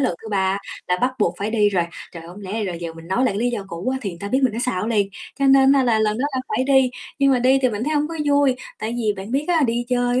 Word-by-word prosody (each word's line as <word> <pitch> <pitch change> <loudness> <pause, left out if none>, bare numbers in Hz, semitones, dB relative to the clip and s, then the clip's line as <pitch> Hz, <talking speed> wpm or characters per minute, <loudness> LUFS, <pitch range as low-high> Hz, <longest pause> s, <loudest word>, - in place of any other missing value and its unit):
lần 255 -10 +1
thứ 220 - -8
3 195 0 +1 0.3
là 180 - +2
bắt 255 +1 +1
buộc 185 -5 +1
phải 205 +2 -2
đi 210 -2 +3
rồi. 185 -4 +1 0.3
Trời, 170 - -9
không 180 +4 -11
lẽ 195 -1 -7
bây 220 -1 -1
giờ 185 - -3
giờ 165 -1 -5
mình 165 +1 -13
nói 190 - 0
lại 250 - +1
cái - - -2
lý 245 +2 +1
do 215 -5 -4
cũ 170 +4 -4
á 265 - -2
thì 200 -6 -3
người 170 - -11
ta 200 - -4
biết 260 - +2
mình 255 - +3
nó 225 - -4
xạo 215 -6 -1
liền, 205 -4 +1 0.3
cho 275 - +2
nên 270 0 +6
á 275 -1 +4
là 230 -3 +3
lần 215 0 +1
đó 260 - 0
là 260 - 0
phải 255 - 0
đi. 265 -2 +4 0.3
Nhưng 275 -1 +4
mà 255 - +3
đi 260 +2 +4
thì 255 - +4
mình 220 0 -3
thấy 305 +2 -1
hông 295 +1 +1
có 330 - -6
vui, 285 -2 +3 0.2
tại 225 +2 -3
vì 220 -3 +1
bạn 195 +3 -7
biết 275 +4 0
á, 335 -3 +3
đi 235 +1 -1
chơi 245 0 +1
235 Hz, 330 wpm, -21 LUFS, 200-260 Hz, 0.3 s, nên